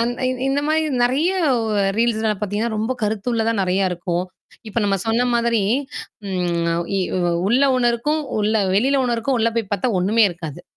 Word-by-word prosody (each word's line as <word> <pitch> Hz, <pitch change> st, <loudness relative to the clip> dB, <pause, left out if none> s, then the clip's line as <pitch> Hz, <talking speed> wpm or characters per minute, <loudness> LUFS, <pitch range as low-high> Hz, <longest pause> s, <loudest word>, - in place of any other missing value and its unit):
அந் 235 Hz, +1 st, +1 dB, 0.2 s
இ -, -, +1 dB, 0.2 s
இந்த 275 Hz, +1 st, +1 dB
மாரி 315 Hz, +1 st, +2 dB, 0.2 s
நறைய 285 Hz, +9 st, +1 dB, 0.7 s
ரீல்ஸ்னால 220 Hz, -2 st, +1 dB
பார்த்தீங்கன்னா, 210 Hz, +2 st, -2 dB
ரொம்ப 225 Hz, +4 st, -1 dB
கருத்துள்ள 220 Hz, +2 st, -1 dB
தான் 210 Hz, -4 st, 0 dB
நறைய 185 Hz, +1 st, +1 dB
இருக்கும். 175 Hz, 0 st, -2 dB, 0.4 s
இப்ப 215 Hz, -, -2 dB
நம்ம 200 Hz, -1 st, +1 dB
சொன்ன 230 Hz, +2 st, +2 dB
மாதிரி 235 Hz, -2 st, +1 dB, 0.7 s
ம். 170 Hz, -2 st, -1 dB, 0.2 s
இ -, -, +1 dB, 0.5 s
உள்ள 245 Hz, +5 st, +3 dB
ஒன்னருக்கும், 245 Hz, +5 st, +1 dB, 0.2 s
உள்ள 215 Hz, +2 st, +1 dB, 0.2 s
வெளில 265 Hz, +7 st, +2 dB
ஒன்னருக்கும் 240 Hz, +2 st, 0 dB
உள்ள 230 Hz, +1 st, +2 dB
போய் 220 Hz, -4 st, -2 dB
பார்த்தா 245 Hz, +5 st, 0 dB
ஒண்ணுமே 215 Hz, +5 st, +3 dB
இருக்காது. 165 Hz, -4 st, -8 dB
225 Hz, 155 wpm, -21 LUFS, 195-240 Hz, 0.7 s, உள்ள